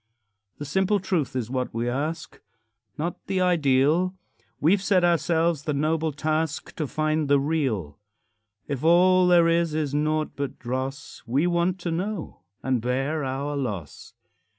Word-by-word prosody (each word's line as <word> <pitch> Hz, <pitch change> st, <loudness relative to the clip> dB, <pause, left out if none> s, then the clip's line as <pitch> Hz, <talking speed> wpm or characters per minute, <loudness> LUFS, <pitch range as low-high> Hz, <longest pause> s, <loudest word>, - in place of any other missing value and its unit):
The 145 Hz, -, -6 dB
simple 190 Hz, +7 st, +1 dB
truth 175 Hz, -9 st, -1 dB
is 120 Hz, -2 st, -3 dB
what 130 Hz, -3 st, -2 dB
we 115 Hz, +1 st, -1 dB
ask, 150 Hz, +6 st, -3 dB, 0.6 s
Not 170 Hz, +3 st, -4 dB
the 190 Hz, -, 0 dB
ideal; 170 Hz, +1 st, +2 dB, 0.4 s
We've 185 Hz, +6 st, +3 dB
set 190 Hz, -2 st, +2 dB
ourselves 170 Hz, -2 st, +2 dB
the 150 Hz, -, -1 dB
noble 155 Hz, +2 st, 0 dB
task 155 Hz, +1 st, -2 dB
To 155 Hz, -, -2 dB
find 155 Hz, +1 st, 0 dB
the 140 Hz, 0 st, +4 dB
real. 130 Hz, -, -1 dB, 0.7 s
If 140 Hz, -2 st, -4 dB
all 180 Hz, +2 st, +5 dB
there 175 Hz, -1 st, +5 dB
is 165 Hz, -2 st, +1 dB
is 150 Hz, -3 st, -1 dB
naught 155 Hz, +1 st, 0 dB
but 140 Hz, -1 st, -4 dB
dross, 130 Hz, +3 st, -5 dB
We 135 Hz, +7 st, +1 dB
want 175 Hz, +1 st, +1 dB
to 170 Hz, -, -2 dB
know 185 Hz, +1 st, -4 dB, 0.2 s
and 130 Hz, -3 st, 0 dB
bear 135 Hz, +6 st, -1 dB
our 135 Hz, +2 st, -3 dB
loss. 105 Hz, -, -5 dB
155 Hz, 150 wpm, -25 LUFS, 135-170 Hz, 0.7 s, all